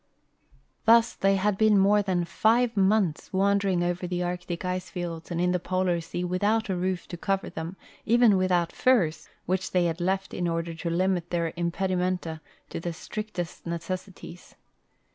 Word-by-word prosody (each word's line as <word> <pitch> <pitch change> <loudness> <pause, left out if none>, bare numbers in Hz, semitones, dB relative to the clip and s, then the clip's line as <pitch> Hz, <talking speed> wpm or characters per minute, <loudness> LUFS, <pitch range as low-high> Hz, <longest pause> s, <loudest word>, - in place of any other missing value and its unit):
Thus 230 +1 +6
they 195 0 +2
had 195 0 0
been 215 -2 +5
more 200 +2 +5
than 185 -3 0
five 230 +6 +2
months 195 -4 +1
wandering 195 -2 +2
over 175 +1 -2
the 180 0 -2
Arctic 175 0 -4
ice 180 0 -3
fields 170 -2 -5
and 170 -1 -2
in 180 +1 +2
the 180 - +1
Polar 180 -1 0
sea 170 +2 -4
without 205 +5 0
a 190 - 0
roof 180 0 -2
to 175 - -6
cover 195 +2 -1
them, 165 +4 -6 0.3
even 235 -2 +5
without 180 -2 +1
furs, 195 -12 +1 0.2
which 185 +1 -1
they 180 -1 +2
had 170 +1 -2
left 190 +2 -1
in 175 - -1
order 165 0 -2
to 165 +1 -4
limit 175 0 0
their 170 -2 -1
impedi 175 +3 -1
menta 180 -3 -2 0.3
to - - -4
the 170 0 -4
strictest 180 -2 -6
necessities. 175 +1 -6
180 Hz, 170 wpm, -27 LUFS, 175-195 Hz, 0.3 s, Thus